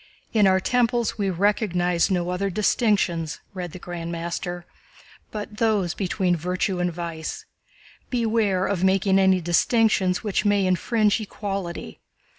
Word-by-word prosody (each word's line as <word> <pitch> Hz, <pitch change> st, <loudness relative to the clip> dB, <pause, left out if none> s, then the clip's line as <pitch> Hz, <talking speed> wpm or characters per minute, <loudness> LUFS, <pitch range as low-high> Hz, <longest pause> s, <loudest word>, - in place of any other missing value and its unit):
"In 210 Hz, -3 st, +5 dB
our 190 Hz, 0 st, +4 dB
temples 240 Hz, +1 st, +1 dB
we 200 Hz, -1 st, +1 dB
recognize 180 Hz, -2 st, +1 dB
no 180 Hz, -2 st, 0 dB
other 195 Hz, +2 st, -1 dB
distinctions," 180 Hz, -5 st, +1 dB
read 180 Hz, -3 st, -5 dB
the 185 Hz, -, -8 dB
Grand 175 Hz, -1 st, -6 dB
Master, 175 Hz, +1 st, -4 dB, 0.6 s
"but 210 Hz, 0 st, -7 dB
those 210 Hz, -7 st, +1 dB
between 185 Hz, -2 st, 0 dB
virtue 180 Hz, +3 st, -1 dB
and 175 Hz, 0 st, 0 dB
vice. 165 Hz, -2 st, -5 dB, 0.6 s
Beware 220 Hz, -6 st, +1 dB
of 190 Hz, -3 st, -1 dB
making 190 Hz, 0 st, +3 dB
any 190 Hz, -1 st, +4 dB
distinctions 185 Hz, +1 st, +2 dB
which 210 Hz, -3 st, 0 dB
may 205 Hz, -2 st, +2 dB
infringe 210 Hz, +4 st, +2 dB
equality. 195 Hz, -, -5 dB
190 Hz, 130 wpm, -24 LUFS, 175-210 Hz, 0.6 s, In